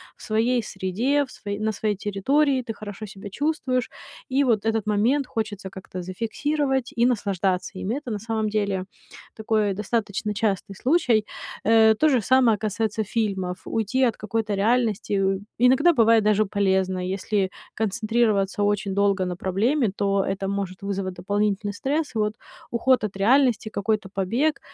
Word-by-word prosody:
в - - -20
своей 230 +3 +1
среде, 215 +10 0
в 260 - -10
сво 205 - -8
на 220 0 0
своей 210 0 -1
территории, 260 +8 +1
ты 230 -2 -5
хорошо 210 0 -8
себя 200 0 -9
чувствуешь. 260 -1 -1 0.4
И 270 +2 +2
вот 225 -4 +1
этот 225 0 +1
момент 225 +7 +2
хочется 215 -3 -4
как-то 185 -1 -8
зафиксировать 265 - -1
и 235 - +4
наслаждаться 195 -6 -1
им. 195 - -3
И - - 0
это 280 -4 -5
на 210 - -2
самом 220 0 -2
деле 200 -3 -1 0.5
такой 215 -2 0
достаточно 210 0 -2
частый 205 -1 -1
случай. 245 - +2 0.4
Э, 220 0 +6
то 310 +7 +3
же 255 -5 +3
самое 245 -1 +4
касается 220 +1 -1
фильмов. 195 -4 -2
Уйти 225 +4 0
от 230 - -2
какой-то 215 0 -2
реальности, 220 0 +1
э, 195 -1 +1 0.2
иногда 265 +7 +5
бывает 230 -3 +5
даже 215 0 +3
полезно. 190 -2 +1
Если 190 +1 -1 0.3
концентрироваться 215 -2 +1
очень 205 -1 0
долго 200 -1 +2
на 180 -1 -3
проблеме, 215 - +1
то 200 -1 +1
это 195 0 -2
может 195 -1 -4
вызвать 195 -1 -3
дополнительный 205 +2 -1
стресс. 285 +4 -2
И - - 0
вот 210 0 +1 0.4
уход 250 +1 +2
от 210 -2 -3
реальности, 240 +1 +3
какой-то 210 -1 -1
побег, 230 +11 0
215 Hz, 160 wpm, -24 LUFS, 195-235 Hz, 0.5 s, Э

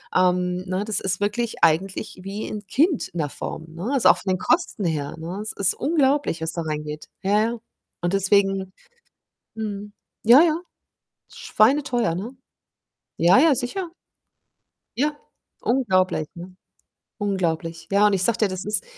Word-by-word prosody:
ähm, 180 0 +2
ne, 185 +2 -1
das 215 -1 0
ist 190 -1 -1
wirklich 220 +3 -2
eigentlich 185 +4 +1
wie 200 +2 -5
'n 210 -1 -6
Kind 305 - +2
in 175 - -7
'ner 150 -2 -1
Form, 160 - -6
ne? 180 +9 -5
Also, 265 - +5
auch - - +6
von 190 - -3
den 185 - 0
Kosten 320 - 0
her, 150 -3 -2
ne? 170 +5 -6
Es 215 - -4
ist 195 -1 +2
unglaublich, 280 - +1
was 160 0 -1
da 170 - -4
reingeht. 150 -1 -5 0.2
Ja, 205 +2 +3
ja. 230 +2 -1 0.4
Und 175 +2 -1
deswegen 195 -1 +2 0.8
mhm, 205 -1 -5 0.3
ja, 240 +6 +8
ja, 320 -2 +3 0.8
schweineteuer, 255 - +2
ne? 195 +7 -5 0.9
Ja, 175 +3 +5
ja, 305 0 +5
sicher. 330 - -3 1.1
Ja, 295 +3 +1 0.5
unglaublich, 185 - +1
ne? 180 +2 -10 0.6
Unglaublich. 170 -4 -2
Ja, 205 +1 +5
und 205 - +1
ich 185 -1 +1
sage 235 +2 +1
dir, 215 - +3
das 185 0 -5
ist 210 +1 0
200 Hz, 155 wpm, -23 LUFS, 180-235 Hz, 1.1 s, ja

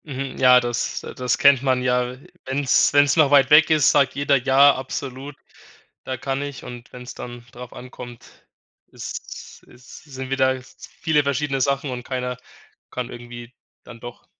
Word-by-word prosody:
Mhm, 135 -2 -6
ja, 125 -1 +7
das 120 -1 -3
das 125 -1 -1
kennt 140 -2 +5
man 130 -2 0
ja. 125 0 0 0.3
Wenn's 135 +1 +2
wenn's 145 0 +4
noch 155 -3 +5
weit 140 -2 +4
weg 150 +1 +7
ist, 155 -3 +4
sagt 135 -3 +2
jeder 140 0 +2
„ja 135 +2 +5
absolut, 135 +1 -6 0.7
da 130 - -4
kann 135 +2 -3
ich“ 140 -2 -7
und 120 -1 -10
wenn's 125 0 -9
dann 120 -1 -9
darauf 125 0 -11
ankommt, 125 -1 -11 0.6
ist's - - -9
ist 125 0 -15
sind 130 -3 -8
wieder 130 -1 +1
v - - -18 0.3
viele 155 -2 +2
verschiedene 140 -1 -1
Sachen 140 +1 0
und 125 -1 -6
keiner 125 -1 -4 0.5
kann 125 -1 -5
irgendwie 120 0 -10 0.3
dann 115 -2 -13
doch. 120 0 -11
130 Hz, 165 wpm, -22 LUFS, 125-140 Hz, 0.7 s, ja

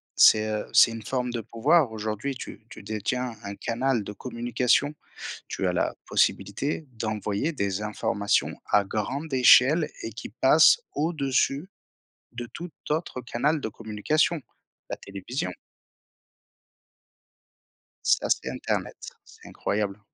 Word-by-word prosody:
C'est, 110 0 +6
heu, 105 -1 -2
c'est 115 - +7
une 115 0 -6
forme 125 +2 -2
de 120 -1 -3
pouvoir. 115 - +2
Aujourd'hui, 110 +5 -3
tu 110 -3 -9
tu - - -11
détiens 110 +4 -2
un 100 0 -6
canal 120 +1 0
de 105 - -7
communication. 120 +5 0 0.6
Tu - - -2
as - - +1
la - - 0
possibilité 150 +2 0
d'envoyer 110 +4 -2
des 100 - -2
informations 105 -1 0
à 105 - +3
grande 130 +10 -3
échelle 130 +5 +6
et 115 - -4
qui 110 - -8
passent 150 - +6
au-dessus 145 0 0 0.6
de 120 0 -6
tout 175 +1 -6 0.2
autre 155 -3 -2
canal 140 +6 0
de 135 - -3
communication, 115 +10 0 0.5
la - - -2
télévision. 100 +1 -5 2.5
Ça, - - +3
c'est - - +1
internet, - - -3 0.3
c'est - - -16
incroyable. 105 -1 -2
120 Hz, 125 wpm, -26 LUFS, 105-140 Hz, 2.5 s, c'est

